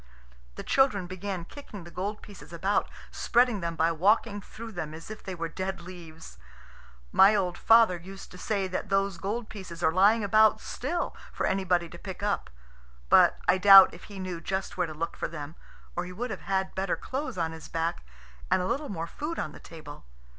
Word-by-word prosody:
The -, -, -7 dB
children 240 Hz, -9 st, +2 dB
began 185 Hz, -1 st, -5 dB
kicking 210 Hz, -6 st, -10 dB
the 170 Hz, -, -12 dB
gold 205 Hz, +4 st, -4 dB
pieces 200 Hz, -4 st, -13 dB
about, 190 Hz, +4 st, 0 dB, 0.2 s
spreading 240 Hz, -3 st, +2 dB
them 170 Hz, 0 st, -3 dB
by 165 Hz, +1 st, +2 dB
walking 205 Hz, +5 st, +2 dB
through 225 Hz, +3 st, -10 dB
them 160 Hz, -6 st, -5 dB
as 165 Hz, +6 st, -10 dB
if 215 Hz, -, -8 dB
they 190 Hz, -, -6 dB
were 165 Hz, -1 st, -3 dB
dead 190 Hz, +3 st, -4 dB
leaves. 170 Hz, -2 st, -11 dB, 0.7 s
My 200 Hz, +3 st, +6 dB
old 180 Hz, -3 st, 0 dB
father 225 Hz, -5 st, +5 dB
used 190 Hz, +3 st, -11 dB
to 180 Hz, -, -11 dB
say 200 Hz, -2 st, -1 dB
that 185 Hz, +2 st, -4 dB
those 195 Hz, -2 st, 0 dB
gold 215 Hz, +5 st, -3 dB
pieces 185 Hz, -6 st, -9 dB
are 160 Hz, -, +4 dB
lying 205 Hz, +5 st, +4 dB
about 215 Hz, +2 st, +4 dB
still 335 Hz, +7 st, -3 dB, 0.2 s
for -, -, -2 dB
anybody 180 Hz, -3 st, +1 dB
to 170 Hz, +1 st, -12 dB
pick 190 Hz, +1 st, -8 dB
up; 205 Hz, -1 st, -1 dB, 0.6 s
but -, -, +6 dB
I 185 Hz, +1 st, +4 dB
doubt 195 Hz, 0 st, +9 dB
if -, -, -12 dB
he 205 Hz, -, -11 dB
knew 185 Hz, -3 st, -5 dB
just 190 Hz, +3 st, -3 dB
where 180 Hz, -2 st, 0 dB
to 155 Hz, -, -7 dB
look 165 Hz, +2 st, -3 dB
for -, -, -3 dB
them, 150 Hz, -2 st, -7 dB, 0.4 s
or 175 Hz, -, -2 dB
he 180 Hz, -, -8 dB
would 240 Hz, +7 st, -4 dB
have -, -, -6 dB
had 190 Hz, 0 st, -1 dB
better 190 Hz, 0 st, -1 dB
clothes 270 Hz, -5 st, -5 dB
on 165 Hz, -2 st, -1 dB
his 160 Hz, -1 st, -9 dB
back 165 Hz, -, -2 dB, 0.5 s
and -, -, +3 dB
a 180 Hz, -, -1 dB
little 275 Hz, +8 st, -2 dB
more 165 Hz, -4 st, -3 dB
food 300 Hz, -, -5 dB
on 155 Hz, -, -3 dB
the -, -, -12 dB
table. 150 Hz, -, -11 dB
190 Hz, 205 wpm, -28 LUFS, 170-205 Hz, 0.7 s, doubt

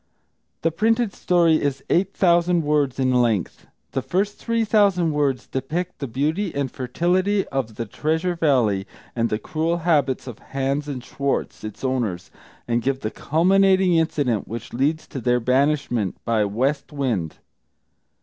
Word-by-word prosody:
The 165 Hz, -, +2 dB
printed 225 Hz, +4 st, +1 dB
story 170 Hz, -3 st, +3 dB
is 140 Hz, -1 st, -2 dB
eight 190 Hz, +3 st, +2 dB
thousand 175 Hz, -1 st, +3 dB
words 145 Hz, -3 st, +1 dB
in 130 Hz, -1 st, +1 dB
length. 115 Hz, -7 st, 0 dB, 0.2 s
The 135 Hz, -, -1 dB
first 190 Hz, +10 st, -1 dB
three 230 Hz, -1 st, 0 dB
thousand 200 Hz, -6 st, +3 dB
words 145 Hz, -4 st, 0 dB
depict 165 Hz, +7 st, -4 dB
the 140 Hz, -, -3 dB
beauty 155 Hz, -, -1 dB
and 140 Hz, -3 st, -1 dB
fertility 180 Hz, +10 st, 0 dB
of 130 Hz, -5 st, -3 dB
the 115 Hz, -, -3 dB
Treasure 160 Hz, -, -1 dB
Valley, 120 Hz, -, +2 dB, 0.3 s
and 115 Hz, -1 st, +1 dB
the 105 Hz, -, 0 dB
cruel 160 Hz, +9 st, -1 dB
habits 145 Hz, -6 st, +2 dB
of 125 Hz, -4 st, -8 dB
Hans 135 Hz, +2 st, -2 dB
and 130 Hz, -4 st, -5 dB
Schwartz, 140 Hz, -1 st, -2 dB
its 110 Hz, +3 st, -8 dB
owners, 120 Hz, -9 st, -2 dB, 0.4 s
and 120 Hz, 0 st, +1 dB
give 135 Hz, +2 st, -1 dB
the 110 Hz, -, -3 dB
culminating 190 Hz, +3 st, +3 dB
incident 145 Hz, -9 st, 0 dB
which 115 Hz, +2 st, -7 dB
leads 145 Hz, +6 st, 0 dB
to 135 Hz, -, -7 dB
their 125 Hz, 0 st, +2 dB
banishment 130 Hz, -, +1 dB
by 110 Hz, -3 st, +2 dB
"West 130 Hz, +11 st, -1 dB
Wind." 120 Hz, -, -2 dB
140 Hz, 150 wpm, -23 LUFS, 125-170 Hz, 0.4 s, story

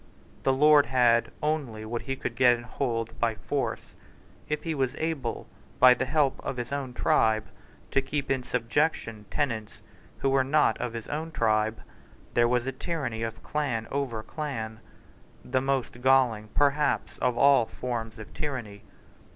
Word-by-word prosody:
The 135 Hz, -, +2 dB
lord 150 Hz, +2 st, +6 dB
had 120 Hz, -2 st, +3 dB
only 140 Hz, -8 st, -2 dB
what 115 Hz, +2 st, -3 dB
he 135 Hz, +3 st, -3 dB
could 120 Hz, -2 st, -4 dB
get 125 Hz, -1 st, +5 dB
and 120 Hz, 0 st, -9 dB
hold 115 Hz, -3 st, -3 dB
by 115 Hz, -2 st, +1 dB
force. 140 Hz, +6 st, -3 dB, 0.6 s
If 150 Hz, -, -2 dB
he 165 Hz, -, -2 dB
was 130 Hz, -4 st, -1 dB
able, 155 Hz, -7 st, -3 dB, 0.3 s
by 130 Hz, 0 st, +9 dB
the 125 Hz, +1 st, -2 dB
help 145 Hz, -2 st, +2 dB
of 130 Hz, -, -4 dB
his 120 Hz, +1 st, -4 dB
own 140 Hz, -3 st, -3 dB
tribe, 110 Hz, -2 st, +2 dB, 0.5 s
to 135 Hz, -, +3 dB
keep 135 Hz, +1 st, -3 dB
in 135 Hz, -1 st, +1 dB
subjection 120 Hz, -3 st, -1 dB
tenants 115 Hz, -7 st, -2 dB, 0.4 s
who 135 Hz, -, 0 dB
were 135 Hz, -1 st, +4 dB
not 150 Hz, +3 st, +3 dB
of 125 Hz, -2 st, -3 dB
his 115 Hz, -1 st, -6 dB
own 155 Hz, +2 st, -3 dB
tribe, 110 Hz, -4 st, +1 dB, 0.5 s
there 120 Hz, 0 st, +4 dB
was 125 Hz, 0 st, +1 dB
a 135 Hz, -, -1 dB
tyranny 130 Hz, -5 st, -3 dB
of 115 Hz, 0 st, -4 dB
clan 135 Hz, -7 st, -2 dB
over 130 Hz, -6 st, -2 dB
clan, 115 Hz, -8 st, -5 dB, 0.7 s
the 130 Hz, +1 st, 0 dB
most 135 Hz, -2 st, -1 dB
galling, 125 Hz, -5 st, +3 dB
perhaps, 145 Hz, +1 st, +1 dB
of 125 Hz, -2 st, +1 dB
all 140 Hz, -5 st, +5 dB
forms 115 Hz, -2 st, -4 dB
of 110 Hz, -1 st, -10 dB
tyranny. 120 Hz, -9 st, -5 dB
125 Hz, 160 wpm, -27 LUFS, 115-140 Hz, 0.7 s, by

